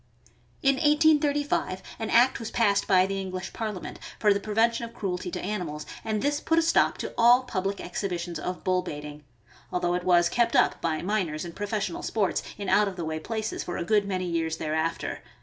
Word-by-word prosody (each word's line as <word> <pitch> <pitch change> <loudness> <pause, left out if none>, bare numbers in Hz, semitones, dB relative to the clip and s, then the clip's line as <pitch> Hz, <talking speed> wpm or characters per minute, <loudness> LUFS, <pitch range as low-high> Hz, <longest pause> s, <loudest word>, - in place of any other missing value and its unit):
In 275 -1 +4
1835 295 - +2 0.2
an 225 - -3
act 250 +3 +4
was 230 - -5
passed 205 -4 +2
by 185 -1 +5
the 195 0 -2
English 185 -1 -5
Parliament 215 -5 -5 0.2
for 210 -2 +4
the 200 - -1
prevention 225 +3 +1
of 230 0 -7
cruelty 180 -2 -3
to - - -4
animals, 175 -7 -4 0.2
and 215 -1 -1
this 290 +1 +1
put 325 - +1
a 330 - +5
stop 330 - +3
to - - -5
all 240 +2 +6
public 195 -4 -2
exhibitions 175 -1 -4
of 180 0 -5
bull 185 0 +2
baiting, 150 -3 -7 0.5
although 175 -1 0
it 180 0 -1
was 175 -1 +4
kept 235 +4 +1
up - - +3
by 160 -1 -1
miners 180 -6 -1
and 170 -1 -8
professional 205 -3 -2
sports, 205 -4 0 0.2
in 200 -1 -5
out 210 +2 +4
of 195 - -4
the 170 -2 -4
way 160 0 -3
places, 220 +5 -3
for 175 - -4
a - - -2
good 205 +1 +2
many 185 -2 -2
years 165 -2 -1
thereafter. 160 +1 -2
195 Hz, 200 wpm, -27 LUFS, 175-225 Hz, 0.5 s, all